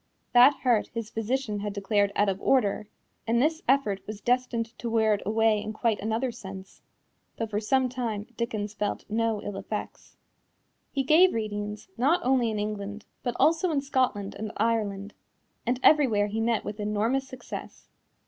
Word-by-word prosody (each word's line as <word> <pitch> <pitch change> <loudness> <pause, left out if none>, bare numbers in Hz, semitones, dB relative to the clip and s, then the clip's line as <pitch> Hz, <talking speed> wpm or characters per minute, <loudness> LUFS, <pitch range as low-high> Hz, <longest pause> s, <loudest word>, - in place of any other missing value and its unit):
That 250 +4 +8
heart 240 -5 +3
his 230 -1 -4
physician 225 -1 -2
had 205 0 -3
declared 200 0 +1
out 205 - +3
of 195 0 -1
order, 215 -5 +2 0.4
and 235 +1 +2
this 315 +5 +1
effort 245 -7 +2
was 215 -1 -6
destined 240 -1 0
to 235 - -3
wear 220 -1 +3
it 205 - -1
away 220 0 +3
in 215 +1 -5
quite 220 -1 0
another 225 +4 -1
sense, 195 -4 -10 0.6
though 225 - -1
for 210 -1 -2
some 260 +4 +2
time 235 -5 -3
Dickens 215 -3 -3
felt 210 -1 -3
no 225 -1 0
ill 205 -1 -5
effects. - - -6 0.7
He 275 - 0
gave 320 +5 +5
readings, 210 -1 -4
not 285 +9 +3
only 250 -2 +3
in 215 - -2
England, 205 0 -4 0.2
but 245 -1 -2
also 330 +3 +3
in 300 -4 +1
Scotland 255 -8 0
and 215 0 -5
Ireland, 210 -2 -1 0.5
and 245 +1 +1
everywhere 250 -10 +5
he 215 +2 -2
met 230 -1 0
with 210 - -5
enormous 215 +6 0
success. 260 -1 -9
225 Hz, 165 wpm, -27 LUFS, 210-250 Hz, 0.7 s, That